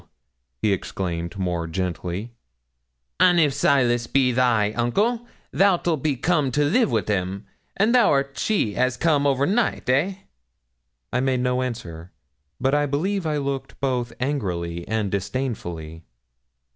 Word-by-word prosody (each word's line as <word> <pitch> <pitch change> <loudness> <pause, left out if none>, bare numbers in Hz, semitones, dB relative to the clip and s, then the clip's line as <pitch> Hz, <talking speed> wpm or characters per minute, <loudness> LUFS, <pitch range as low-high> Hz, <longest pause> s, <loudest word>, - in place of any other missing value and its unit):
he 105 -2 +3
exclaimed 85 -1 -4
more 90 -3 -2
gently, 90 +5 -4 0.9
'an' 180 -1 +5
if 150 -4 +4
Silas 120 -4 +2
be 130 -1 +2
thy 120 -4 +2
uncle 210 - 0 0.3
thou'lt 175 -6 +2
be 150 -1 0
come 150 +1 +1
to 145 +3 +1
live 235 - +3
wi' 110 -3 +1
him, 95 0 -2 0.3
and 215 +4 +3
thou'rt 140 - +3
she 120 - 0
as 130 0 +1
come 145 -3 +2
overnight 140 - +1
eh?' 165 +9 +1 1.0
I 125 - +2
made 130 -1 +1
no 125 0 +1
answer, 90 -9 -6 0.5
but 135 +2 +1
I 145 0 +2
believe 175 +6 -1
I 150 -1 0
looked 135 -1 -4
both 125 -3 -1
angrily 90 - -2
and 110 -3 -1
disdainfully. 95 -7 -4
125 Hz, 130 wpm, -23 LUFS, 100-145 Hz, 1.0 s, an